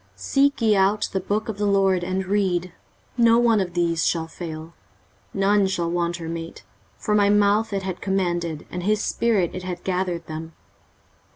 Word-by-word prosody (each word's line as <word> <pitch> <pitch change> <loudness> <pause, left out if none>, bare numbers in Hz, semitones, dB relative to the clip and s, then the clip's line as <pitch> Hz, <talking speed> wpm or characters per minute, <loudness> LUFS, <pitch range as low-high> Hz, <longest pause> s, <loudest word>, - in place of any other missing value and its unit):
23:034:016 - - -26
Seek 280 -1 +1
ye 215 -2 +4
out 195 +2 +2
of - - -8
the 190 - -1
book 205 +3 -2
of 215 -2 -5
the 205 - +1
LORD, 195 -2 +2
and 185 +1 -2
read: 185 -3 0 0.4
no 230 -1 +5
one 235 -2 +4
of 180 -3 -3
these 170 -1 +1
shall 165 -1 0
fail, 160 -1 -8 0.6
none 200 0 +2
shall 170 -3 -1
want 170 0 -1
her 165 -2 -7
mate: 165 0 -6 0.3
for 210 - -2
my 205 -1 +4
mouth 205 +2 +3
it 195 -1 -2
hath 185 -2 -5
commanded, 175 -5 -1
and 180 - -4
his 210 +3 +1
spirit 210 -7 +1
it 185 - -5
hath 180 -1 -6
gathered 180 -2 -2
them. 160 +1 -7
190 Hz, 190 wpm, -23 LUFS, 170-205 Hz, 0.6 s, no